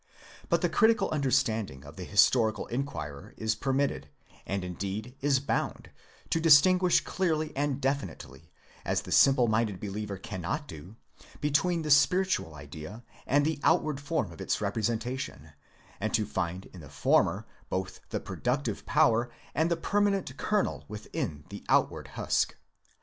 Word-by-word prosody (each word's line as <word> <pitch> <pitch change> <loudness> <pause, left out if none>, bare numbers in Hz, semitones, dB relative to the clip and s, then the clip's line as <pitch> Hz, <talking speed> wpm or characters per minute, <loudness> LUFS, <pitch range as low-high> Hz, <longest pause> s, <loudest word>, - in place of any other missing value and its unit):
But - - +2
the - - +3
critical 220 -4 +3
understanding 115 - 0
of 75 +2 -11
the 90 - -7
historical 110 +2 +3
inquirer 115 - -5
is 110 0 0
permitted, 135 +4 -1 0.4
and 95 -1 -2
indeed 100 +6 -5
is 140 -1 +3
bound, 140 - -2 0.4
to 165 - +2
distinguish 180 +3 +6
clearly 160 -4 -1
and 140 -1 0
defi 135 -5 0
nitely, 80 -1 -13 0.3
as - - 0
the - - -9
simple 130 -3 +5
minded 110 -3 0
believer 105 0 -4
cannot 105 - -4
do, 85 +7 -10 0.4
be 150 - -1
tween 170 +3 +2
the 150 - -1
spiritual 160 - +3
idea 75 +9 -9 0.2
and 145 +2 +3
the 155 -2 -1
outward 155 -4 +2
form 145 - -1
of 80 - -11
its - - -1
representation, 115 - -3 0.5
and 110 +1 0
to 110 - +1
find 95 -2 -3
in 95 - -10
the 75 - -12
former 70 - +2 0.2
both 95 0 -3
the - - -2
productive - - -2
power 120 +2 +3 0.2
and 160 +4 +1
the 170 - +1
permanent 195 -5 0
kernel 210 +6 0
within 100 -8 -5
the - - -8
outward - - +2
husk. - - +1
120 Hz, 150 wpm, -29 LUFS, 95-145 Hz, 0.5 s, distinguish